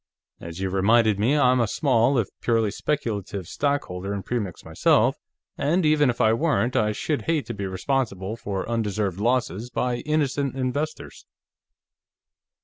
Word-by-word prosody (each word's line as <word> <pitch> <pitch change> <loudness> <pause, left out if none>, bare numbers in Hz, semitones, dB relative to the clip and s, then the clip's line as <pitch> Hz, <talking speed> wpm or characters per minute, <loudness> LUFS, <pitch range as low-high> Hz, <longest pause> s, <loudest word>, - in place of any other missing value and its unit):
As 85 +1 -8
you 95 -1 -2
reminded 105 +2 +3
me, 125 +8 +2
I'm 130 -3 +4
a 115 - +2
small, 130 +1 +2
if 115 - +1
purely 115 -3 +1
speculative, 105 - -3
stockholder 100 -9 -2
in 100 - -5
Premix, 105 -8 -4
myself, - - +3 0.4
and 170 +4 +1
even 150 -2 +4
if 120 - -2
I 110 -2 +4
weren't, 130 -2 +1
I 105 0 +2
should 145 +7 -2
hate 160 -3 +1
to 120 - -5
be 100 -2 -4
responsible 100 0 -2
for 100 -4 -4
undeserved 105 -5 -1
losses 120 -1 0
by 125 -1 -1
innocent 145 -2 -1
investors." 140 +4 -4
115 Hz, 145 wpm, -24 LUFS, 100-140 Hz, 0.4 s, I'm